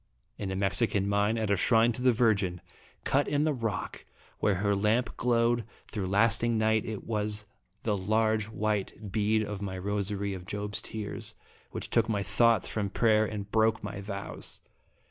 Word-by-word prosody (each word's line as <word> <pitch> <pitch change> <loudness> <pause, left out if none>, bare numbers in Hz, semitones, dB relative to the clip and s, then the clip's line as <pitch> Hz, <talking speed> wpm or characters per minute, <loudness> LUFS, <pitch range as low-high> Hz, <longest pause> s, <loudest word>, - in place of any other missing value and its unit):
In 100 - -3
a 95 - -2
Mexican 100 +1 +2
mine, 100 +2 +2
at 110 -2 -1
a - - +4
shrine 115 +4 +4
to 120 - -3
the 130 0 +5
Virgin, 105 -7 +2 0.4
cut 140 +2 +1
in 145 0 +1
the 155 -1 +2
rock 115 -5 -4 0.4
where 105 - +2
her 100 +2 +1
lamp 110 +4 +1
glowed 120 0 +2 0.2
through 100 -4 -4
last 105 +4 +3
ing 120 -1 +2
night, 110 0 +2
It 110 -2 -5
was 105 -1 -2 0.4
the 105 -2 +1
large 110 +2 +1
white 105 -1 -2
bead 110 +1 +2
of 105 -1 -5
my 95 -2 -4
rosary 100 +1 -2
of 90 -1 -8
Job's 105 0 -2
Tears, 105 -2 -5 0.3
which - - -6
took 115 -1 +2
my 100 -3 0
thoughts 110 +1 +3
from 105 -2 -2
prayer 110 0 +3
and 100 -1 -6
broke 110 0 +2
my 100 - -5
vows. 100 0 -7
105 Hz, 175 wpm, -29 LUFS, 100-115 Hz, 0.4 s, the